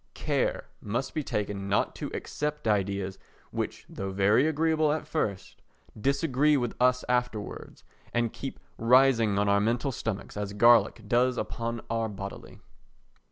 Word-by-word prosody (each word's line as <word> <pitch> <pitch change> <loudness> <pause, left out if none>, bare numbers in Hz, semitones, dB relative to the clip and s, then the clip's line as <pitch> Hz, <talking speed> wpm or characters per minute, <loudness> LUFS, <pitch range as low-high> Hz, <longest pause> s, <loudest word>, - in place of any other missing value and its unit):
Care - - 0 0.2
must 120 +6 -3
be 155 - -1
taken 100 -4 -3
not 100 - +1
to - - -4
accept 150 -3 -3
ideas 100 -2 0 0.3
which - - -4
though 95 - -5
very 100 +8 +3
agreeable 160 0 +2
at 155 - -2
first 100 -11 -3 0.3
disagree 140 +4 +2
with 120 -3 -1
us 125 0 +3
afterwards, 125 -4 -2 0.3
and 120 -1 0
keep 135 - -6 0.2
rising 115 -3 +4
on 100 0 +2
our 100 0 +4
mental 120 +5 0
stomachs, 110 -4 -4
as 105 -1 -4
garlic 115 +1 +5
does 125 +2 +2
upon 115 0 -3
our 115 -1 0
bodily. 100 -1 -8
115 Hz, 140 wpm, -28 LUFS, 105-135 Hz, 0.3 s, garlic